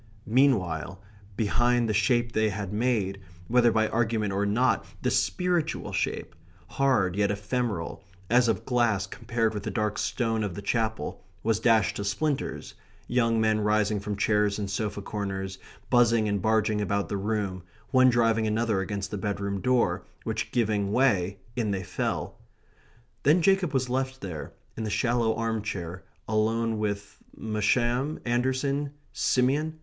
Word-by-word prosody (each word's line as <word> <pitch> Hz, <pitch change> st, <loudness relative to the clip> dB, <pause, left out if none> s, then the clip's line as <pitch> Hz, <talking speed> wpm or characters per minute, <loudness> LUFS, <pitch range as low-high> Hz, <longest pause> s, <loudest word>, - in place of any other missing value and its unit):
Meanwhile 100 Hz, -, +1 dB, 0.4 s
behind 120 Hz, +3 st, +2 dB
him -, -, +1 dB
the 110 Hz, -, 0 dB
shape 120 Hz, +2 st, +2 dB
they 110 Hz, -1 st, +2 dB
had 100 Hz, -1 st, -4 dB
made, 105 Hz, -4 st, 0 dB, 0.3 s
whether 120 Hz, 0 st, +4 dB
by 110 Hz, 0 st, +2 dB
argument 110 Hz, -3 st, 0 dB
or 100 Hz, +1 st, 0 dB
not, 120 Hz, +6 st, +2 dB, 0.2 s
the -, -, +1 dB
spiritual 175 Hz, -3 st, 0 dB
shape, -, -, -2 dB, 0.4 s
hard 125 Hz, -10 st, +2 dB
yet 100 Hz, 0 st, +2 dB
ephemeral, 105 Hz, -3 st, -2 dB, 0.2 s
as 120 Hz, +2 st, +4 dB
of 115 Hz, -, 0 dB
glass 115 Hz, -6 st, +2 dB
compared 115 Hz, +3 st, -1 dB
with 105 Hz, -, -3 dB
the -, -, -4 dB
dark 105 Hz, -2 st, -1 dB
stone 115 Hz, 0 st, 0 dB
of 100 Hz, -5 st, -3 dB
the 100 Hz, -, -5 dB
Chapel, 110 Hz, +1 st, -2 dB, 0.2 s
was 110 Hz, -1 st, +1 dB
dashed 110 Hz, -3 st, +3 dB
to 100 Hz, -, -3 dB
splinters, 140 Hz, +8 st, -2 dB, 0.3 s
young 115 Hz, -2 st, +2 dB
men 110 Hz, -1 st, +2 dB
rising 105 Hz, 0 st, +2 dB
from 105 Hz, +1 st, -4 dB
chairs 105 Hz, 0 st, +2 dB
and 100 Hz, -2 st, -3 dB
sofa 105 Hz, 0 st, -3 dB
corners, 95 Hz, -2 st, -4 dB, 0.3 s
buzzing 115 Hz, -2 st, +4 dB
and 100 Hz, -2 st, 0 dB
barging 110 Hz, 0 st, +2 dB
about 100 Hz, -1 st, 0 dB
the -, -, -3 dB
room, 100 Hz, -2 st, -2 dB, 0.3 s
one 130 Hz, -1 st, +6 dB
driving 115 Hz, -2 st, +2 dB
another 110 Hz, -1 st, +1 dB
against 100 Hz, +1 st, -3 dB
the 105 Hz, -, -3 dB
bedroom 100 Hz, -1 st, -2 dB
door, 125 Hz, +1 st, +2 dB, 0.2 s
which -, -, -3 dB
giving 105 Hz, -4 st, +1 dB
way, 100 Hz, -7 st, +2 dB, 0.2 s
in 115 Hz, -4 st, 0 dB
they 95 Hz, -2 st, -1 dB
fell. -, -, -3 dB, 0.8 s
Then 155 Hz, +7 st, +4 dB
Jacob 195 Hz, -4 st, +3 dB
was 130 Hz, -2 st, 0 dB
left 130 Hz, +1 st, -2 dB
there, 85 Hz, -6 st, -6 dB, 0.2 s
in 110 Hz, -, -4 dB
the 110 Hz, -, -2 dB
shallow 115 Hz, 0 st, +1 dB
arm 115 Hz, -1 st, -1 dB
chair, 90 Hz, -4 st, -5 dB, 0.2 s
alone 110 Hz, +1 st, +1 dB
with 100 Hz, -1 st, -3 dB, 0.2 s
Masham? 120 Hz, +6 st, 0 dB
Anderson? 130 Hz, +4 st, 0 dB, 0.2 s
Simeon? 145 Hz, +5 st, +1 dB
110 Hz, 155 wpm, -27 LUFS, 100-120 Hz, 0.8 s, one